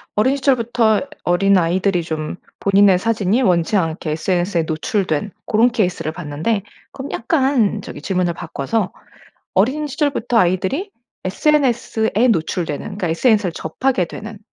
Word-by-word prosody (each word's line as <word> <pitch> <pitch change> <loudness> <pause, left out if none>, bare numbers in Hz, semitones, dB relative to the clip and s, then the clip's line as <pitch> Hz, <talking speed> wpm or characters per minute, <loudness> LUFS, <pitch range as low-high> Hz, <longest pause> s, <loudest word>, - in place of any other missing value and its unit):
어린 260 +7 +2
시절부터 235 -5 +2 0.2
어린아이들이 185 0 +2
좀 160 +1 -4 0.2
본인의 195 -1 +5
사진이 220 +2 +1
원치 180 -2 +2
않게 165 -4 -1
SNS에 175 +2 0
노출된 160 +3 -1
고런 230 +3 +3
케이스를 180 -8 -1
봤는데 170 +6 -2 0.3
그럼 270 +1 -7
약간 250 - +1
저기 145 - -9
질문을 180 0 0
바꿔서 170 +5 -3 0.6
어린 265 +10 +1
시절부터 275 -5 0
아이들이 190 - +1 0.4
SNS에 240 -1 +1
노출되는 160 -3 -1
그러니까 195 -3 -4
SNS를 205 +2 +2
접하게 180 +5 -1
되는 215 +4 -9
200 Hz, 340 characters per minute, -19 LUFS, 175-230 Hz, 0.6 s, 본인의